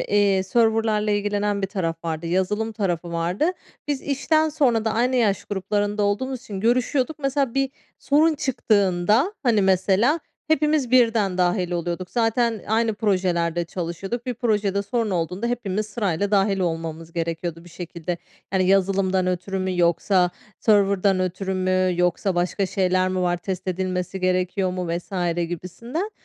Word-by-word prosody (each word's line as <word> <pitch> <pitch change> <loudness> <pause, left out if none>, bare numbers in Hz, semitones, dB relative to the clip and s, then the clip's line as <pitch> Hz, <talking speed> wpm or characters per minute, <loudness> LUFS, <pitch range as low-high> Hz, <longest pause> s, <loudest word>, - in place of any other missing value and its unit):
iii, 200 -2 +2
server'larla 220 0 +2
ilgilenen 205 0 0
bir - - +1
taraf 165 -4 -3
vardı, 165 0 -3
yazılım 190 +6 0
tarafı 175 -5 -2
vardı. 175 - 0 0.4
Biz 285 -2 -1
işten 310 +3 +1
sonra 250 -7 +2
da 220 - +1
aynı 250 +3 +2
yaş 210 -5 +1
gruplarında 205 +1 -1
olduğumuz 250 +6 -1
için 195 -4 -7
görüşüyorduk. 255 +6 +1
Mesela, 275 -3 0
bir 270 -1 +1 0.3
sorun 310 +3 +3
çıktığında, 215 - +2
hani, 225 -6 +3
mesela, 195 - +3 0.3
hepimiz 300 -4 +2
birden 225 -7 +3
dâhil 180 0 +1
oluyorduk. 175 +1 -3
Zaten 230 -1 +1
aynı 225 0 +2
projelerde 180 -5 0
çalışıyorduk. 185 +8 -5
Bir 250 - -2
projede 210 -4 0
sorun 225 0 -1
olduğunda 180 +5 -2
hepimiz 215 -4 -2
sırayla 205 -3 -1
dâhil 195 -1 +2
olmamız 165 -1 -3
gerekiyordu 165 0 -3
bir 175 - -14
şekilde. 170 0 -5 0.3
Yani, 190 -1 +2
yazılımdan 190 -1 +2
ötürü 185 +2 -2
mü 185 -1 -2
yoksa 180 +1 +3 0.3
server'dan 200 -2 +3
ötürü 185 +1 -2
mü 185 0 +1
yoksa 180 +2 +1
başka 180 +3 0
şeyler 185 0 +1
mi 185 0 -1
var, 175 -1 +1
test 185 +1 -5
edilmesi 185 0 -2
gerekiyor 185 +1 0
mu 180 -1 -3
vs. 175 0 -2
gibisinden. 230 - -5
195 Hz, 145 wpm, -23 LUFS, 180-225 Hz, 0.4 s, sorun